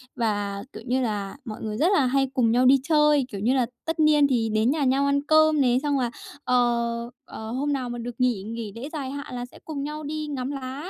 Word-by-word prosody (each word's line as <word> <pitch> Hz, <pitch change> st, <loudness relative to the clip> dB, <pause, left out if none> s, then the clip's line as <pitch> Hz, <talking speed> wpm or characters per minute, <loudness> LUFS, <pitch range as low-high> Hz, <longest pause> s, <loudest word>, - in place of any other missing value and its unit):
Và, 205 Hz, -3 st, -1 dB
kiểu 220 Hz, -, -9 dB
như 255 Hz, +2 st, +1 dB
là, 210 Hz, -1 st, -3 dB
mọi 215 Hz, -3 st, -7 dB
người 215 Hz, -1 st, -4 dB
rất 315 Hz, +8 st, +3 dB
là 285 Hz, -9 st, +4 dB
hay 270 Hz, +1 st, +2 dB
cùng 245 Hz, -4 st, +2 dB
nhau 250 Hz, +2 st, +3 dB
đi 270 Hz, +2 st, +6 dB
chơi, 300 Hz, -2 st, +3 dB
kiểu 200 Hz, -, -5 dB
như 240 Hz, +6 st, +2 dB
là, 255 Hz, -2 st, +2 dB, 0.2 s
tất 325 Hz, 0 st, -3 dB
niên 300 Hz, -2 st, +5 dB
thì 235 Hz, -4 st, +1 dB
đến 220 Hz, +4 st, +2 dB
nhà 305 Hz, -1 st, 0 dB
nhau 270 Hz, +1 st, +2 dB
ăn 280 Hz, 0 st, +2 dB
cơm 310 Hz, 0 st, +4 dB
này, 250 Hz, -1 st, +3 dB
xong 290 Hz, -2 st, +1 dB
là, 240 Hz, -2 st, -1 dB, 0.3 s
ờ, 235 Hz, -1 st, +1 dB, 0.2 s
ờ, 220 Hz, 0 st, -8 dB
hôm 285 Hz, +4 st, -1 dB
nào 255 Hz, -3 st, -2 dB
mà 240 Hz, -, -5 dB
được 240 Hz, 0 st, -6 dB
nghỉ 245 Hz, -6 st, +1 dB
nghỉ 225 Hz, 0 st, -5 dB
lễ 255 Hz, +6 st, -6 dB
dài 275 Hz, -4 st, -4 dB
hạn 285 Hz, -2 st, -6 dB
là 245 Hz, 0 st, -4 dB
sẽ 245 Hz, -, -16 dB
cùng 290 Hz, -3 st, -4 dB
nhau 300 Hz, +1 st, -5 dB
đi 305 Hz, +1 st, -4 dB
ngắm 270 Hz, -2 st, -3 dB
lá, 275 Hz, +4 st, -6 dB
255 Hz, 250 wpm, -25 LUFS, 235-285 Hz, 0.3 s, đi